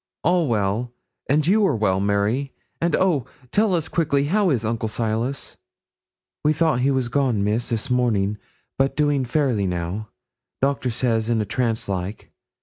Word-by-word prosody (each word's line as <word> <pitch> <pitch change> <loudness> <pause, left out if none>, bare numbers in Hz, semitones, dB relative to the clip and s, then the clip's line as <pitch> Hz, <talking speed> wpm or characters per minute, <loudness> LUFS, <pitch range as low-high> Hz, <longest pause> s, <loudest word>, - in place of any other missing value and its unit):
'All 175 -2 +3
well, 110 +1 0 0.4
and 145 +2 +3
you 210 +5 +4
are - - +1
well, 95 -4 +1
Mary? 105 +7 0 0.3
and 170 -2 +2
oh! 170 -9 +1 0.2
tell 205 -3 +3
us 165 -2 -1
quickly 145 -4 +1
how 195 +6 +2
is 120 -7 0
Uncle 110 0 -1
Silas?' 115 +4 -2 0.9
'We 150 - +4
thought 155 -4 +2
he 130 +2 +2
was 130 -3 +1
gone, 125 -5 +1
Miss, 110 +4 0
this 115 +3 -2
morning, 105 -5 +1 0.4
but 135 0 +2
doing 145 -3 +2
fairly 125 -7 +1
now; 90 +5 -3 0.5
doctor 135 -2 0
says 115 -1 0
in 115 -1 +2
a 105 - 0
trance 115 +1 -1
like. 95 +1 -4
125 Hz, 160 wpm, -23 LUFS, 110-145 Hz, 0.9 s, you